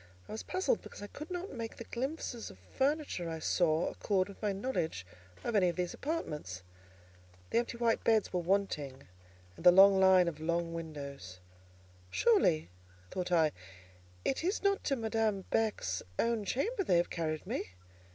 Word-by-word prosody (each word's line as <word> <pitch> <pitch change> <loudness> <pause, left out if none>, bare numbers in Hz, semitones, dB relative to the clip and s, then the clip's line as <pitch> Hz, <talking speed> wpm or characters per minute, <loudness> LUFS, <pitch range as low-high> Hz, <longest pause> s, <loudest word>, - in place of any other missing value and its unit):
I - - -10
was 220 - -4
puzzled, 375 +6 0
because - - -10
I 205 - -9
could 305 +2 -7
not 360 +1 -4
make 230 -3 -5
the - - -6
glimpses 250 -1 -4
of - - -13
furniture 265 - -1
I 165 - -3
saw 160 0 +2
accord 195 -2 0
with 200 - -12
my 210 -2 +1
knowledge 185 - -2 0.4
of 235 - -2
any 185 -3 +5
of 170 - -3
these 180 -1 -2
apartments. 150 - -4 0.9
The - - +4
empty 235 0 -3
white 235 -1 +1
beds 220 -4 +3
were 180 - +1
wanting, 165 -7 -1 0.5
and - - -12
the 180 - +10
long 195 +1 +8
line 190 -2 +6
of 160 -3 -3
large 170 +2 0
windows. 145 - -7 0.7
"Surely," 180 - +3 0.4
thought 180 -1 -3
I, 160 -3 +4 0.7
"it 270 - 0
is 375 +5 0
not 395 0 +2
to 275 - +2
Madame 220 -3 0
Beck's 210 - 0 0.2
own 230 -3 +1
chamber 390 - 0
they 180 - +3
have 170 - +1
carried 155 -2 -2
me!" - - -2
195 Hz, 170 wpm, -33 LUFS, 165-235 Hz, 0.9 s, the